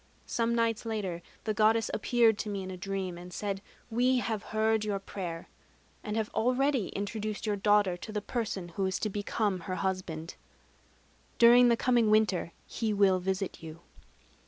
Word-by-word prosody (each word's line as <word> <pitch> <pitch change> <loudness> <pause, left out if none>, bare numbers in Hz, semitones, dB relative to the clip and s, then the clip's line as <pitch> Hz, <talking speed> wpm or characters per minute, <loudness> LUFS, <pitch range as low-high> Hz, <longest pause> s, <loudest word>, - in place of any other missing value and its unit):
Some 235 0 0
nights 230 -1 +1
later, 205 -7 -3 0.2
the 215 - -1
Goddess 220 +1 +3
appeared 225 -1 +3
to 215 - -3
me 200 -2 -3
in 190 - -6
a - - -5
dream, 190 -1 -4
and 180 +1 -10
said: 195 +1 -3 0.3
'We 250 +3 +3
have 225 -4 -1
heard 220 0 +1
your 205 -2 -1
prayer, 180 -4 -6 0.6
and 210 -1 -3
have 220 -1 -1
already 255 -1 +1
introduced 210 +1 -4
your 210 -1 +1
daughter 205 -2 +3
to 215 - -8
the 210 - -1
person 205 -5 -3
who 190 +3 -1
is 190 - -1
to 215 - -2
become 205 -1 -1
her 185 +1 -4
husband. 185 -4 -3 1.0
During 245 +1 +7
the 235 -1 +4
coming 240 -3 +3
winter 210 -5 +2
he 220 -2 -2
will 195 -2 +4
visit 190 +1 -3
you.' 160 0 -9
210 Hz, 170 wpm, -30 LUFS, 190-225 Hz, 1.0 s, During